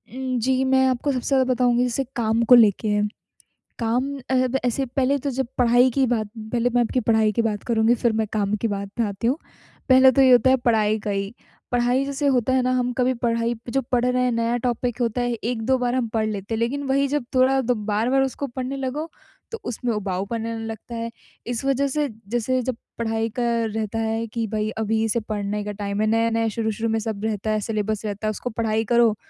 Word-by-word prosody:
उम, 260 -1 -2
जी 260 +2 +1
मैं 265 0 +3
आपको 260 +3 0
सबसे 250 -2 -3
ज़्यादा 270 -2 +3
बताऊँगी 245 0 +2
जैसे 250 +2 -1
काम 230 0 +1
को 250 - +10
लेके 215 -2 +4
है। 210 0 +2 0.8
काम 235 +3 +1 0.3
अ, 255 0 +3 0.2
ऐसे 265 +3 0
पहले 270 +2 +1
तो 280 +2 -2
जब 265 -1 -2
पढ़ाई 245 +1 +5
की 270 +1 +2
बात 220 -3 0 0.2
पहले 245 0 +1
मैं 245 - +5
आपकी 245 +2 0
पढ़ाई 220 -1 +4
की 230 - 0
बात 215 -2 -2
करुँगी 230 0 +2
फ़िर 235 - +3
मैं 220 - 0
काम 205 -1 0
की 230 - +1
बात 200 -1 -4
में 230 - +3
आती 200 +3 -3
हूँ। 270 +5 +1 0.5
पहले 260 0 +7
तो 270 - +3
ये 260 -1 +6
होता 245 +1 +6
है 260 - +6
पढ़ाई 215 -1 +3
का 210 - -5
ही। 200 +2 -3 0.4
पढ़ाई 245 +2 +2
जैसे 280 +1 -1
होता 250 +1 +1
है 260 - +3
ना 255 0 +1
हम 250 -1 0
कभी 255 +1 +2
पढ़ाई 230 0 0
जो 270 +2 0
पढ़ 245 0 +2
रहे 250 0 +2
हैं 250 - +2
नया 230 +1 0
टॉपिक 245 0 -2
होता 235 +1 0
है 245 0 0
1-2 235 +3 -1
बार 245 0 -1
हम 245 -3 0
पढ़ 220 -1 +1
लेते 205 +1 -4
हैं। 220 - -1
लेकिन 275 +5 -1
वही 275 +1 +2
जब 285 -3 -1
थोड़ा 265 +1 +4
द 250 0 0 0.2
बार-बार 235 +6 +2
उसको 270 +2 -3
पढ़ने 260 +2 -4
लगो 280 +5 -3 0.4
तो 455 - -5
उसमें 240 0 -2
उबाऊ 195 -2 -2
पन 225 +1 -4
आने 225 -1 -4
लगता 225 +1 -7
है। 230 0 -3 0.4
इस 245 +1 -3
वजह 275 +1 +2
से 295 +1 0 0.2
जैसे 240 +3 0
जब 255 0 -2 0.2
पढ़ाई 225 0 -1
का - - +1 0.2
रहता 220 0 -3
है 225 +1 -1
कि 225 +1 -3
भाई 215 0 -2
अभी 220 0 0
इसे 225 +1 +1
पढ़ने 210 -1 -3
का 210 - -4
टाइम 200 0 -3
है 215 - +2
नया-नया 225 0 +1
शुरू-शुरू 225 0 -1
में 225 0 +1
सब 215 -2 -4
रहता 215 -1 -2
है 215 - +1
सिलेबस 215 0 -2
रहता 210 +1 -3
है - - +1
उसको 245 +4 -5
पढ़ाई 220 0 -1
करो। 235 -2 +4
235 Hz, 225 wpm, -23 LUFS, 220-255 Hz, 0.8 s, को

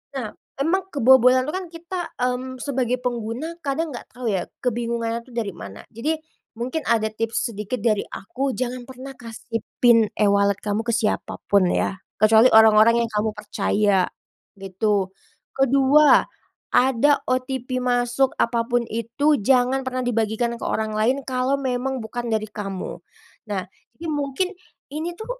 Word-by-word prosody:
Nah, 235 -6 -4 0.2
emang 375 +6 0
kebobolan 255 0 +5
itu 305 - -3
kan 375 -1 -3
kita, 345 +2 -6 0.2
mmm, 250 +1 -2
sebagai 255 -2 -1
pengguna 245 +6 -4
kadang 290 0 -2
gak - - -9
tau 245 0 -6
ya, 190 -4 0 0.2
kebingungannya 235 -1 -2
tuh 255 - -18
dari 205 -6 -3
mana. 100 - -10
Jadi 305 +8 -2 0.4
mungkin 255 +6 -3
ada 220 -2 +2
tips 225 +3 -2
sedikit 210 +4 -4
dari 215 -4 +1
aku 265 +7 -3
jangan 250 0 -3
pernah 260 +1 -10
kasih 230 -1 -6 0.2
PIN 230 -3 +5
e-wallet 200 -1 +3
kamu 210 +2 -2
ke 235 - -1
siapa 225 -2 -1
pun 195 -3 +4
ya, 195 - 0 0.2
kecuali 220 +3 +6
orang-orang 220 +1 +6
yang - - -13
kamu 215 +1 +1
percaya 210 -2 +1 0.6
gitu, 195 +1 0 0.5
kedua 275 +3 +5 0.5
ada 265 +3 +3
OTP 255 0 -2
masuk 245 +1 +1
apa 230 -1 0
pun 240 -1 +1
itu 235 +6 +1
jangan 255 +4 +3
pernah 255 0 -2
dibagikan 235 0 -1
ke - - -7
orang 220 0 -1
lain 245 +6 +1
kalau 255 +1 0
memang 260 -1 -2
bukan 240 +2 -5
dari 220 -1 -1
kamu. 195 -3 -5 0.5
Nah, 195 -3 -2 0.3
jadi 330 +1 -7
mungkin 290 +6 -1 0.4
ini 330 +4 -4
tuh - - -6
245 Hz, 150 wpm, -23 LUFS, 220-265 Hz, 0.6 s, kecuali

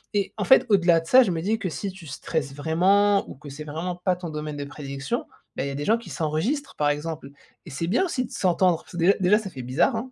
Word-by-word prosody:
et 200 -2 0
en 210 - -1
fait, 265 - +6
au-delà 175 -5 +4
de 165 - -13
ça, 260 +8 +7
je 200 - -1
me 165 -2 -2
dis 215 +6 0
que 190 - -2
si 195 +4 -4
tu 185 -2 -13
stresses 140 0 -3
vraiment 195 +7 +3
ou - - -8
que 145 +2 -12
c'est 140 +2 -8
vraiment 165 +4 -4
pas 180 +1 0
ton 175 -1 -7
domaine 150 -1 -5
de 145 - -4
prédilection, 140 -1 -5 0.3
beh, - - -2
il - - -2
y - - -4
a - - -5
des 145 +1 -4
gens 225 +2 +3
qui 235 - -12
s'enregistrent, 185 - -2
par 145 -1 +1
exemple 150 -1 -4 0.3
et - - -9
c'est 150 +5 -3
bien 235 - +2
aussi 255 -8 -2
de - - -14
s'entendre. 180 -2 +2
Parce - - -18
que, - - -6
déjà 175 +3 +5
déjà, 195 +3 +4
ça 210 -3 -6
fait 130 - -7
bizarre, 130 - +1
hein, 240 +3 -4
170 Hz, 280 wpm, -25 LUFS, 150-200 Hz, 0.3 s, ça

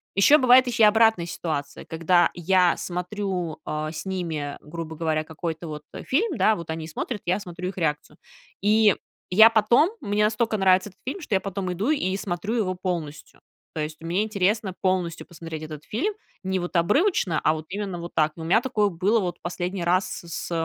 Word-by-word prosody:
ещё 285 +10 +6
бывает 255 0 +6
и 230 -2 +2
обратная 220 -4 +5
ситуация, 155 -4 -4
когда 165 +2 +2
я 180 0 +3
смотрю, 180 -2 -3
а, 155 0 -3
с 165 - -7
ними, 165 -6 -3
грубо 160 +1 -7
говоря, 155 -1 -1
какой-то 160 +1 -5
вот, 150 -1 -7
э, - - -7
фильм, 405 - 0
да, 220 - +4
вот 170 -3 -8
они 160 0 -4
смотрят, 205 +6 -4
я 180 +3 +1
смотрю 180 -2 -6
их 190 - -10
реакцию. 150 -3 -2 0.4
И 210 0 +4 0.4
я 220 +4 +8
потом, 230 - +4
мне 205 +1 0
настолько 220 0 +1
нравится 190 +1 +3
этот 185 - -25
фильм, 310 +8 -4
что 240 - -5
я - - +3
потом 190 -1 -4
иду 205 +9 -2
и 195 -11 +1
смотрю 195 +2 -3
его 185 -5 0
полностью. 175 -5 -5 0.3
То - - -5
есть, 155 +1 -5
мне 175 +5 0
интересно 205 -1 0
полностью 180 -4 -1
посмотреть 165 -2 -8
этот 155 -1 -8
фильм 340 - -1 0.3
не 190 0 -1
вот 175 +1 -5
обрывочно, 195 - +2
а 155 - +4
вот 155 0 -7
именно 195 -2 -4
вот 170 0 -8
так. 155 0 +2
Но 165 - -8
у - - -5
меня 220 +8 +4
такое 215 -6 +1
было 195 +6 +1
вот 175 -3 -3
последний 180 +1 -3
раз 185 +2 +2 0.2
с 170 - -15 0.2
с - - -10
185 Hz, 195 wpm, -24 LUFS, 165-210 Hz, 0.4 s, я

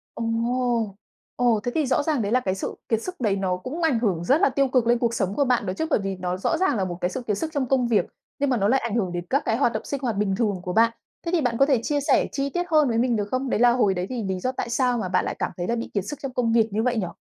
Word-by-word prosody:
Ồ! 230 -1 -1 0.4
Ồ, 240 -3 +2
thế 245 - -2
thì 315 -2 +2
rõ 260 +2 +1
ràng 295 -5 0
đấy 205 -1 -2
là 255 - +4
cái 190 -6 -2
sự 195 - -4
kiệt 225 -1 +1
sức 365 +6 -5
đấy 210 -4 +2
nó 190 -2 -1
cũng 260 - -6
ảnh 310 -8 +2
hưởng 190 -8 0
rất 275 - +3
là - - +5
tiêu 275 +1 +1
cực 250 -3 +1
lên 240 0 +4
cuộc 235 -1 0
sống 195 -3 -1
của 285 - +2
bạn 250 -2 +1
đó 185 - -2
chứ? 320 - -2
Bởi - - +3
vì 195 0 -2
nó 180 0 -2
rõ 185 - 0
ràng 375 -10 +1
là 190 - 0
một 175 -1 -5
cái 180 - +1
sự 255 - -5
kiệt 210 -2 0
sức 320 -1 -3
trong 285 -3 0
công 255 -1 +2
việc, 210 -6 +2 0.3
nhưng 285 0 +1
mà 250 - +2
nó 200 -2 +2
lại 265 +5 +3
ảnh 230 -3 -3
hưởng 195 -6 0
đến 175 0 -4
các 275 +3 +1
cái 225 - +1
hoạt 240 -3 +2
động 220 - -3
sinh 280 - -3
hoạt 225 -5 -1
bình 195 -2 +1
thường 205 -5 -1
của 180 - -3
bạn. 230 +2 +4 0.3
Thế 335 - -1
thì 345 - +2
bạn 245 -4 0
có 275 - +5
thể 275 -4 +2
chia 290 +2 0
sẻ - - +3
chi 275 0 -1
tiết 350 +6 -1
hơn 305 -2 +5
với 225 - 0
mình 240 0 +2
được 205 -2 -1
không? 255 0 -1
Đấy - - 0
là 245 0 +6
hồi 235 -5 +2
đấy 180 -1 -2
thì 245 -3 -3
lý 190 -2 -2
do 255 +7 -1
tại 255 - -4
sao 245 0 +1
mà 190 -5 -3
bạn 180 0 +1
lại - - -3
cảm - - -1
thấy 175 0 -3
là 235 - 0
bị 235 - -5
kiệt 200 - 0
sức 295 - -6
trong 275 -2 -5
công 240 -3 +1
việc 225 -1 +4
như 215 +2 0
vậy 245 -1 +1
nhỉ? 190 -5 -1
235 Hz, 340 wpm, -24 LUFS, 200-260 Hz, 0.4 s, là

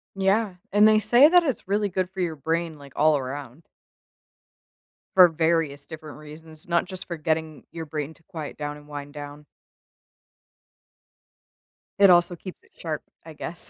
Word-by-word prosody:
Yeah, 195 +1 +1 0.2
and 210 +1 +6
they 215 0 +5
say 240 +7 +6
that 355 +1 +6
it's 270 - -3
really 205 +1 +1
good 185 0 -2
for 190 - -9
your 170 -3 -1
brain, 160 +2 -2
like, 140 -2 -14
all 155 0 +4
around. 135 +2 -7 1.5
For 185 -1 +9
various 160 -3 0
different 155 -2 -10
reasons, 155 +2 -12
not 170 0 +2
just 185 0 -8
for 170 - -6
getting 155 -1 -2
your 165 -1 -6
brain 150 0 -5
to 165 - -24
quiet 160 -5 -7
down 145 0 -5
and 150 0 -16
wind 145 -1 -8
down. 145 0 -9 2.5
It 200 -1 +7
also 175 0 +4
keeps 185 +2 -11
it - - -27
sharp, 155 -3 -5 0.2
I 160 - -10
guess. 160 +2 -6
160 Hz, 160 wpm, -25 LUFS, 150-185 Hz, 2.5 s, For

